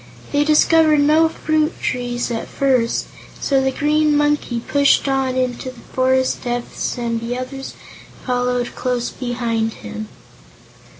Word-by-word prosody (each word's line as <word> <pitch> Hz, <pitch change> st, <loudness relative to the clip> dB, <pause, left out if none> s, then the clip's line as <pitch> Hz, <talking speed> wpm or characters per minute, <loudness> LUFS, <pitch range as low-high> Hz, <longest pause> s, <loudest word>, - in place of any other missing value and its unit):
They 290 Hz, 0 st, +3 dB
discovered 310 Hz, 0 st, +4 dB
no 310 Hz, +3 st, +4 dB
fruit 310 Hz, 0 st, -1 dB
trees, 245 Hz, -1 st, -2 dB
at 225 Hz, -, -3 dB
first, 255 Hz, -4 st, +1 dB, 0.3 s
so 270 Hz, -2 st, +2 dB
the 265 Hz, -, +2 dB
Green 300 Hz, +2 st, +2 dB
Monkey 295 Hz, -5 st, +1 dB
pushed 280 Hz, +4 st, +2 dB
on 270 Hz, -1 st, 0 dB
into 255 Hz, 0 st, -2 dB
the 255 Hz, -2 st, -12 dB
forest 260 Hz, 0 st, 0 dB
depths 245 Hz, 0 st, -3 dB
and 230 Hz, -1 st, -1 dB
the 240 Hz, +2 st, -3 dB
others 270 Hz, +1 st, -6 dB, 0.5 s
followed 245 Hz, -1 st, -1 dB
close 250 Hz, -1 st, -2 dB
behind 235 Hz, -3 st, -2 dB
him. 215 Hz, 0 st, -6 dB
255 Hz, 130 wpm, -19 LUFS, 245-290 Hz, 0.5 s, discovered